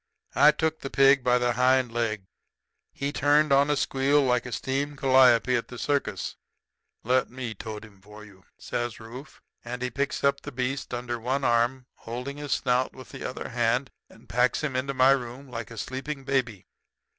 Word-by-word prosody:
"I 145 +2 +6
took 160 +1 0
the 135 - -6
pig 135 -1 +5
by 125 0 +3
the 125 0 +1
hind 125 0 +3
leg. 115 -4 -2 0.7
He 140 +1 -3
turned 145 0 +3
on 140 +1 +4
a 150 - +3
squeal 140 +1 +2
like 125 -2 +1
the 125 - -6
steam 140 +6 -2
calliope 130 -2 +4
at 120 - -2
the 125 - -9
circus. 145 +3 -2 0.7
"'Let 130 +2 +1
me 125 -2 -5
tote 110 +1 -8
him 105 -2 -18
in - - -26
for 105 +2 -13
you,' 95 -3 -18
says 120 -1 -4
Rufe; 120 +6 -11 0.2
and 125 +1 -5
he 125 - -2
picks 140 +4 -2
up 140 0 +2
the - - -8
beast 135 +2 -3
under 120 -1 -4
one 130 +4 -1
arm, 120 +2 +1
holding 125 +5 -6
his 145 -1 -6
snout 125 0 0
with 130 - -12
the - - -9
other 130 - -5
hand, 120 +2 0 0.2
and - - -19
packs 125 +1 +1
him 140 -4 -2
into 135 +2 -2
my 130 +1 +5
room 130 +1 -2
like 115 -3 -6
a 115 - -11
sleeping 135 +5 -5
baby. 125 -8 -1
125 Hz, 190 wpm, -26 LUFS, 120-135 Hz, 0.7 s, I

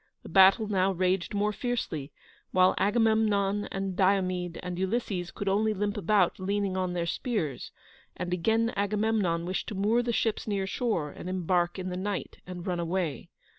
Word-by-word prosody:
The - - -10
battle 195 +3 +6
now 195 -2 +2
raged 185 +2 0
more 210 +1 +1
fiercely, 200 - -3 0.4
while 185 0 +4
Agamemnon 210 -2 +2
and 195 -1 -3
Diomede 185 -3 +1
and 180 0 -4
Ulysses 190 -3 -1
could 200 - -6
only 215 +2 +2
limp 205 +1 -1
about 195 -2 +2
leaning 200 0 -1
on 185 -1 -1
their 170 -1 -1
spears; 170 - -3 0.5
and 180 0 -3
again 225 +6 +1
Agamemnon 205 -4 0
wished 185 +2 -3
to 215 - -5
moor 210 +5 +2
the 240 0 -1
ships 225 -1 -1
near 200 -2 0
shore, 190 - -1
and 180 - -8
embark 180 -1 0
in 185 0 -4
the 180 - -4
night 200 +1 -4
and 180 -1 -7
run 180 -3 -1
away. 170 -5 -2
195 Hz, 170 wpm, -28 LUFS, 180-210 Hz, 0.5 s, battle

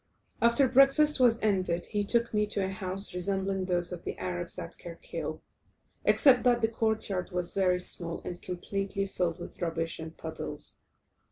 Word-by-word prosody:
After 235 +3 +5
breakfast 275 +4 +5
was 240 -3 +5
ended 185 -5 +1
he 205 -1 -1
took 235 +3 +1
me 210 0 +2
to 200 -2 -1
a - - -2
house 190 -1 -2
resembling 190 +1 -1
those 175 -1 0
of 180 - -6
the - - -5
Arabs 175 -1 -2
at 170 - -6
Kerkil, 170 -1 -6 0.6
except 260 -3 +6
that 240 -1 +3
the 225 - +4
court 220 -1 0
yard 185 -3 -2
was 180 -1 -3
very 185 -2 +2
small, 170 -1 -1
and 175 - -6
completely 195 +2 -3
filled 175 -3 -1
with 175 - -10
rubbish 165 -1 -2
and 160 0 -8
puddles. 160 -1 -6
190 Hz, 170 wpm, -29 LUFS, 175-220 Hz, 0.6 s, except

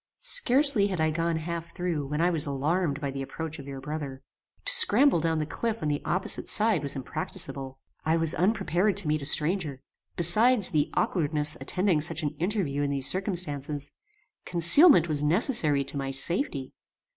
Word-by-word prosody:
"Scarcely 280 - +4
had 185 -4 -5
I 160 0 0
gone 165 +1 -2
half 170 +1 -6
through 170 -6 -4
when 150 +3 -3
I 175 +1 +1
was 155 -4 +2
alarmed 145 +2 -2
by 140 -2 -4
the 135 0 -6
approach 160 +3 -7
of 140 - -11
your 135 -1 -8
brother. 140 -2 -7 0.4
To - - +6
scramble 455 - +5
down 165 0 -1
the 155 - -2
cliff 225 +6 -5
on 150 - -1
the 145 0 -3
opposite 185 +2 -1
side 215 -6 +3
was 140 -1 0
impracticable. 135 0 -6 0.3
I 160 +1 0
was 165 0 0
unprepared 195 0 -1
to 195 -6 0
meet 155 0 -1
a 140 - -4
stranger. 155 -3 0 0.4
Besides 215 +6 +3
the 150 -2 -1
aukwardness 150 -3 -1
attending 180 -4 -1
such 160 +1 -2
an 145 - -2
interview 175 -6 -2
in 145 - -1
these 140 -2 -2
circumstances, 150 -7 -1 0.5
concealment 175 - +5
was 150 -3 -1
necessary 155 - +1
to 140 - -5
my 135 -1 -4
safety. 135 - 0
160 Hz, 175 wpm, -26 LUFS, 145-190 Hz, 0.5 s, To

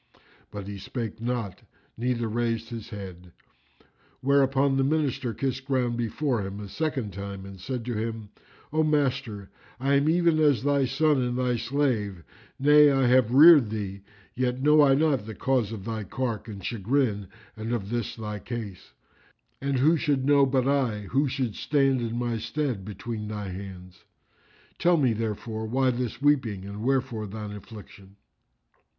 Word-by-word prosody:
But 100 -1 -7
he 100 -1 -6
spake 120 -2 -5
not 115 -6 -3 0.3
neither 120 0 -1
raised 115 0 -1
his 115 -3 -7
head; 90 -4 -9 0.9
whereupon 135 0 +3
the 135 - +3
Minister 140 -4 0
kissed 135 +3 -3
ground 125 -3 0
before 120 +1 -1
him 95 +1 -5
a 105 - -7
second 130 -4 -3
time 100 0 -6
and 100 -1 -10
said 125 +2 -4
to 120 - -2
him, 110 -1 -4 0.4
"O 155 - +3
Master,[FN#357] 135 -9 0 0.3
I 135 +2 +1
am 140 +2 +3
even 170 -1 +3
as 145 -6 +3
thy 140 -1 +2
son 145 +2 +2
and 125 0 -1
thy 125 -1 +1
slave, 115 - -1 0.3
nay, 150 +2 +6
I 135 -1 +2
have 125 -2 +4
reared 145 -3 +8
thee; 100 -2 -4 0.3
yet 125 0 -1
know 150 +1 +6
I 135 -2 +5
not 140 -7 +1
the 110 - -6
cause 125 -4 0
of 105 -4 -7
thy 110 -2 -3
cark 115 +1 -3
and 100 -4 -8
chagrin 110 -2 0 0.3
and 110 +1 -5
of 105 -4 -3
this 120 -2 -2
thy 105 -2 -5
case; 110 -3 -7 0.7
and 140 -1 0
who 155 +6 +4
should 140 -4 0
know 140 -1 +5
but 130 -1 +1
I 130 -7 +1
who 140 +2 +2
should 130 -4 -2
stand 135 -1 +1
in 115 0 -3
my 120 -2 -1
stead 115 -1 -2
between 105 +2 -6
thy 105 -2 -5
hands? 90 -1 -9 0.8
Tell 175 0 +4
me 130 -6 +3
therefore 110 0 -4
why 130 +3 +2
this 125 -2 -3
weeping 130 -9 +1
and 100 +1 -7
wherefore 130 -4 0
thine 105 +1 -6
affliction." 100 -1 -12
120 Hz, 165 wpm, -26 LUFS, 105-135 Hz, 0.9 s, reared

